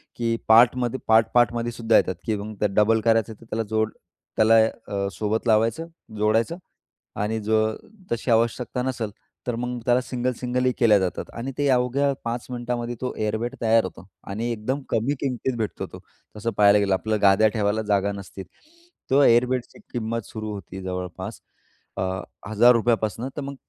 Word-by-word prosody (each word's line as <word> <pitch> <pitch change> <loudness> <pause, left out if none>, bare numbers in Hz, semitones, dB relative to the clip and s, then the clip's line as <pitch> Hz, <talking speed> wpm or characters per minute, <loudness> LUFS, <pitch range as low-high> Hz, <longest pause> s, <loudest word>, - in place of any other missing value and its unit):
की 115 -1 0
पार्टमध्ये, 120 +2 +5
पार्ट 110 0 +5
पार्टमध्ये 120 0 +2
सुद्धा 115 -1 +2
येतात. 95 - +1
की 110 - 0
मग 105 +1 -7
त्याला 105 -2 0
डबल 110 +1 +3
करायचं 115 -1 +2
तर - - -14
त्याला 115 0 -2
जोड 110 0 0 0.4
त्याला 110 +1 +5 0.3
अ, 100 -1 -2
सोबत 110 +2 -2
लावायचं, 115 +8 +2 0.3
जोडायचं 110 +8 +1 0.7
आणि 110 +2 -1
जर 110 +1 +1 0.4
तशी 120 +1 -1
आवश्यकता 120 +2 +1
नसेल, 120 -5 -3 0.4
तर 120 - 0
मग 125 0 -3
त्याला 125 0 +3
सिंगल, 125 0 -2
सिंगलही 125 0 0
केलं 110 -4 +5
जातं. 95 -2 -2
आणि 120 +3 -5
ते 145 - +1
अवघ्या 130 +2 +2
5 120 +1 -3
मिनिटांमध्ये 120 0 -3
तो 125 - -2
एअर 110 0 -1
बेड 120 +2 -4
तयार 115 -1 +4
होतो 90 -1 -8 0.2
आणि 115 +4 -2
एकदम 125 +6 -3
कमी 115 +6 0
किमतीत 130 -1 -2
भेटतो 110 -2 -3
तो. - - -11 0.4
तसं 115 +2 -2
पाहायला 105 0 +6
गेलं, 100 -1 +1
आपलं 110 +3 -1
गाद्या 100 +2 +5
ठेवायला 105 0 +1
जागा 100 0 +1
नसते. 100 -1 -8 0.7
त्या 140 +1 +5
एअर 120 +1 +5
बेडची 125 +6 -4
किंमत 115 -1 -2
सुरू 110 -1 -6
होते 95 -1 -8
जवळपास 95 +2 -5 0.6
अ, - - -1 0.5
₹1,000 115 +1 +4
पासून, 110 +3 -3
तर - - -2
मग 140 0 -6
115 Hz, 170 wpm, -24 LUFS, 105-120 Hz, 0.7 s, पाहायला